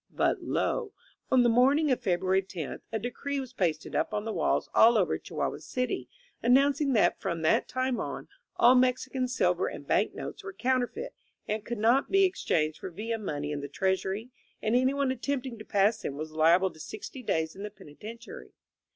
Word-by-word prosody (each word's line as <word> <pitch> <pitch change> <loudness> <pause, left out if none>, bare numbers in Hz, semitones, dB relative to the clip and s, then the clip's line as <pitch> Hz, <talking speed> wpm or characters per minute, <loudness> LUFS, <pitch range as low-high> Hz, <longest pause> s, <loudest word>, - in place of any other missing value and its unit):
But - - 0
lo! 460 -5 -1 0.4
on 255 -1 +5
the - - +4
morning 270 +6 +4
of 255 - +1
February 190 -2 +1
tenth, 185 -5 -6
a 225 - 0
decree 275 +5 -3
was 260 -1 -7
pasted 165 -8 -1
up 215 - 0
on 210 0 -2
the 225 - -3
walls - - +1
all 230 +1 +6
over 190 - +1
Chihuahua - - -3
City, 250 0 -3 0.3
an 245 +2 +5
nouncing 280 0 +3
that 215 - +3
from 170 -4 -2
that 160 - +3
time 255 -2 -1
on - - -5 0.3
all 240 +2 +6
Mexican 255 0 +1
silver 250 - +1
and - - -7
bank - - +1
notes 415 - -7
were 390 -1 -7
counterfeit 260 - -1 0.3
and 215 0 -2
could 240 - -4
not 235 +6 +3
be 390 0 +5
ex 375 0 -3
changed 155 -1 +1
for - - -6
Villa 225 +6 -4
money 145 -7 -3
in 145 -1 -3
the 145 - -5
Treasury, 190 - -1 0.3
and 220 +2 0
anyone 265 +2 +2
attempting 260 -2 -3
to - - -8
pass 205 +2 +2
them 140 - -4
was 155 +1 -5
liable 170 +4 +4
to 155 - -17
sixty 215 - -8
days 160 -8 -1
in 195 - -9
the 210 - -4
penitentiary. 215 - -11
230 Hz, 195 wpm, -29 LUFS, 190-260 Hz, 0.4 s, all